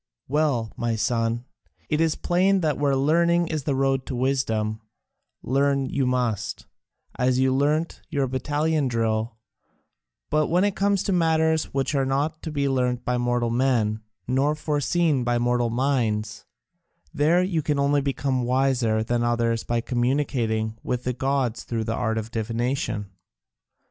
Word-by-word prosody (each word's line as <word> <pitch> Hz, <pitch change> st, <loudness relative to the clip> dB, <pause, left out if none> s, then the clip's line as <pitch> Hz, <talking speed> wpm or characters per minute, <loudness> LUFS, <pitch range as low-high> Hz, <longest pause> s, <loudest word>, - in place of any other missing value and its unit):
"Well, 135 Hz, -6 st, 0 dB
my 120 Hz, -1 st, -1 dB
son, 115 Hz, +1 st, 0 dB, 0.4 s
it 155 Hz, +1 st, 0 dB
is 160 Hz, -2 st, +2 dB
plain 185 Hz, +2 st, +2 dB
that 150 Hz, -4 st, 0 dB
where 140 Hz, -2 st, +2 dB
learning 170 Hz, +4 st, +2 dB
is 155 Hz, -3 st, -3 dB
the 140 Hz, -, 0 dB
road 135 Hz, -1 st, 0 dB
to 130 Hz, -, -3 dB
wisdom, 115 Hz, -4 st, 0 dB, 0.6 s
learn 140 Hz, +1 st, +1 dB
you 135 Hz, -2 st, 0 dB
must, 110 Hz, -5 st, -1 dB, 0.5 s
as 125 Hz, 0 st, +2 dB
you 130 Hz, 0 st, +3 dB
learnt 150 Hz, +4 st, 0 dB
your 140 Hz, -4 st, 0 dB
battalion 145 Hz, +3 st, 0 dB
drill, 115 Hz, -1 st, -1 dB, 0.9 s
but 155 Hz, 0 st, +2 dB
when 175 Hz, +3 st, +2 dB
it 205 Hz, -1 st, +1 dB
comes 200 Hz, -1 st, +1 dB
to 195 Hz, -, 0 dB
matters 160 Hz, -2 st, +2 dB
which 135 Hz, +2 st, -2 dB
are 135 Hz, -2 st, +2 dB
not 145 Hz, +4 st, -1 dB
to 160 Hz, -, -5 dB
be 140 Hz, -2 st, 0 dB
learnt 125 Hz, -2 st, 0 dB
by 125 Hz, 0 st, 0 dB
mortal 120 Hz, -1 st, 0 dB
men, 115 Hz, -4 st, +1 dB, 0.3 s
nor 135 Hz, +4 st, +1 dB
foreseen 150 Hz, -1 st, +1 dB
by 120 Hz, 0 st, +1 dB
mortal 120 Hz, 0 st, +1 dB
minds, 115 Hz, -4 st, -1 dB, 0.7 s
there 165 Hz, +5 st, +3 dB
you 180 Hz, -4 st, 0 dB
can 150 Hz, -1 st, -1 dB
only 140 Hz, +1 st, +2 dB
become 135 Hz, -1 st, -1 dB
wiser 125 Hz, -3 st, +1 dB
than 120 Hz, +1 st, 0 dB
others 115 Hz, -1 st, 0 dB
by 120 Hz, 0 st, -1 dB
communicating 120 Hz, -3 st, -1 dB
with 125 Hz, 0 st, -3 dB
the 125 Hz, -, -1 dB
gods 130 Hz, -2 st, -1 dB
through 115 Hz, -2 st, -3 dB
the 110 Hz, +1 st, -2 dB
art 110 Hz, 0 st, -1 dB
of 110 Hz, 0 st, -4 dB
divination. 115 Hz, -2 st, -2 dB
130 Hz, 155 wpm, -24 LUFS, 120-150 Hz, 0.9 s, you